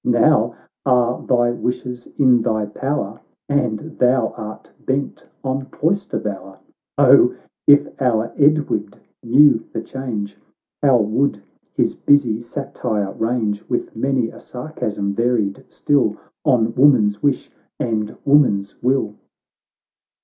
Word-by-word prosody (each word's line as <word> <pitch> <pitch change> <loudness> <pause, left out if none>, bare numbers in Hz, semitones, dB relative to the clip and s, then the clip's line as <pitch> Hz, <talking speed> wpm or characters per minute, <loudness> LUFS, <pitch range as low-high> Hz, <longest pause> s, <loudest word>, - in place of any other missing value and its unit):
Now - - +3 0.3
are 125 -1 +2
thy 120 -1 +3
wishes 125 0 -4
in 125 -4 +4
thy 110 -1 0
power, 110 -1 -4 0.3
And 140 -7 0 0.2
thou 125 -2 +3
art 110 0 -9
bent 135 +1 -3 0.2
on 135 0 -2
cloister 185 +8 -1
bower! 95 -2 -6 0.4
O! - - +6 0.3
if 145 0 +6
our 115 -3 +1
Edward 140 -9 +1 0.2
knew 130 0 +5
the - - -3
change, 115 -7 -5 0.4
How 135 -3 +5
would 110 +1 0 0.3
his - - +1
busy 125 -6 +2
satire 115 -5 -3
range, 110 -3 -2
With 120 - -3
many 125 0 0
a - - -13
sarcasm 110 -7 -4
varied 115 -3 0
still 125 -8 +1 0.3
On 115 -5 +2
woman's 120 -7 +4
wish, 140 -3 0 0.3
and 110 -3 -2
woman's 125 -9 +2
will 125 -4 0
120 Hz, 115 wpm, -20 LUFS, 110-135 Hz, 0.4 s, O